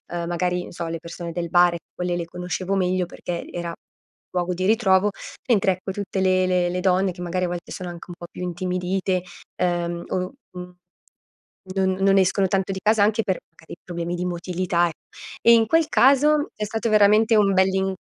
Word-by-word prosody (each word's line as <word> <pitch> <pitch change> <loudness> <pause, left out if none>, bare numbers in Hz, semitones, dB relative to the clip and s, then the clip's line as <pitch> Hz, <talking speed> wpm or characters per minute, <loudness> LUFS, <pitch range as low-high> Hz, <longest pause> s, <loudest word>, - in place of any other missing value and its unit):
uhm, 170 -1 -2
magari, 180 +1 -1
non - - -10
so, 170 -1 -5
le 165 0 -3
persone 170 +1 -7
del 170 0 -4
bar, 175 0 +4 0.2
quelle 180 0 -2
le 175 - -2
conoscevo 180 +2 -3
meglio 185 -1 +1
perché 170 0 -6
era, 170 -1 -4 0.6
luogo 180 0 -1
di 185 +1 -3
ritrovo, 210 -2 +3 0.4
mentre 195 -4 +4
ecco, 185 +1 -5
tutte 200 0 -3
le 185 -1 +3
le 180 -1 +1
le 180 +1 -2
donne 185 0 +2
che 180 - -13
magari 180 +1 -1
a - - -4
volte, 175 0 -6
sono 180 -2 -6
anche 170 -1 -10
un 175 - -7
po' 175 - -8
più - - -10
intimidite, 180 +1 -1 0.4
ehm, 175 -1 -1
o - - -1 0.4
n 180 0 -8 1.0
non 190 -1 +2
non 195 0 +5
escono 190 +1 +3
tanto 195 0 0
di 190 - -5
casa 215 0 +3
anche 215 +2 +2
per 190 -3 -1
magari 165 0 -13
problemi 170 -1 -4
di 180 +1 -3
motilità, 175 0 0
e - - -4 0.5
e 235 - +7
in 225 -1 +4
quel 325 +4 +3
caso, 290 +3 +4
è 210 - -3
stato 225 +2 -2
veramente 215 +1 +5
un 200 -2 +4
bell'in 190 0 +2
185 Hz, 195 wpm, -23 LUFS, 175-195 Hz, 1.0 s, e